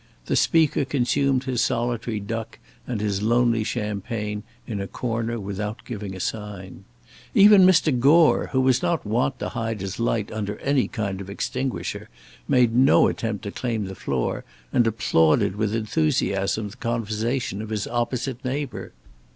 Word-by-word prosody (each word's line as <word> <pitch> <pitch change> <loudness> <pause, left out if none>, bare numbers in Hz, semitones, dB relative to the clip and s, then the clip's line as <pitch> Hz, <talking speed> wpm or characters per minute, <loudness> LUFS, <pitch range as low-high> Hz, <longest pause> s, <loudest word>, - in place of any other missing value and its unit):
The - - 0
Speaker 160 -3 +3
consumed 135 0 +1
his 130 -3 -1
solitary 115 -2 -1
duck 115 +2 -5 0.3
and 120 -4 -2
his 100 -2 -1
lonely 115 0 +2
champagne 105 -1 -3 0.2
in 105 -4 -4
a 100 - -4
corner 115 0 -3
without 105 +2 -5
giving 105 -5 -6
a - - -8
sign. 100 -2 -5 0.5
Even 200 -2 +8
Mr. 155 -8 +4
Gore, 155 +6 +5
who 130 - +2
was 130 -1 +3
not 175 -6 0
wont 125 +5 0
to - - -4
hide 115 -1 -3
his 95 +2 -5
light 115 -2 0
under 105 -1 -4
any 140 -2 +2
kind 100 -5 -3
of 100 - -8
extinguisher, 100 -2 -3 0.4
made 120 -3 +3
no 130 +3 +6
attempt 110 -3 -3
to 100 - -4
claim 115 -4 -2
the 95 - -6
floor, 65 -8 -2 0.3
and 120 -2 +4
applauded 85 -5 +2
with 105 0 -1
enthusiasm 110 -5 0
the - - -14
conversation 115 -1 -2
of 110 - -7
his 105 -2 -2
opposite 125 +1 -2
neighbour. 135 -1 -4
115 Hz, 155 wpm, -24 LUFS, 105-125 Hz, 0.5 s, Even